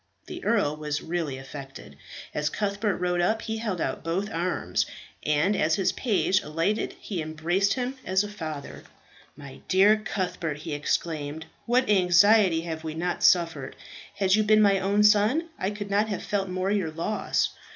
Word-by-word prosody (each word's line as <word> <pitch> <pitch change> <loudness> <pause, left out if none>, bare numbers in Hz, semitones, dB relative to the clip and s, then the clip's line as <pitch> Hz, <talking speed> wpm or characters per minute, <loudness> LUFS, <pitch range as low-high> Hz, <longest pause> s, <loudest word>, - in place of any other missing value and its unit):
The - - -8
earl 175 -10 +1
was 150 -1 -3
really 165 -5 -3
affected. 135 - -10 0.4
As 150 0 0
Cuthbert 200 +2 -1
rode 180 0 0
up 220 +5 +1
he 220 0 -3
held 210 -6 -3
out 135 - -3
both 185 +6 -2
arms, 175 +2 -1 0.3
and 150 +7 +1
as 155 -3 +2
his 195 - +1
page 195 -5 +1
alighted 165 +8 -1
he 185 -6 -4
embraced 170 +6 0
him 255 +1 -3
as 190 +2 +1
a - - -4
father. 160 -8 -7 0.6
"My 140 -2 -11
dear 200 +3 +5
Cuthbert!" 180 -7 -3
he 155 +1 -6
exclaimed. 150 +1 -2 0.2
"What 250 +2 +2
anxiety 190 -1 +5
have 165 -1 -5
we 160 -1 -5
not 175 +2 -2
suffered. 165 -6 +2 0.4
Had 190 -2 +2
you 215 - +5
been 215 0 +4
my 200 -1 +4
own 200 +2 +2
son, 215 +11 +4
I 190 - 0
could 205 -1 -6
not 210 +2 +2
have 200 - -3
felt 195 0 -2
more 185 +1 -1
your 195 -6 0
loss. 165 +7 -1
185 Hz, 170 wpm, -26 LUFS, 160-205 Hz, 0.6 s, dear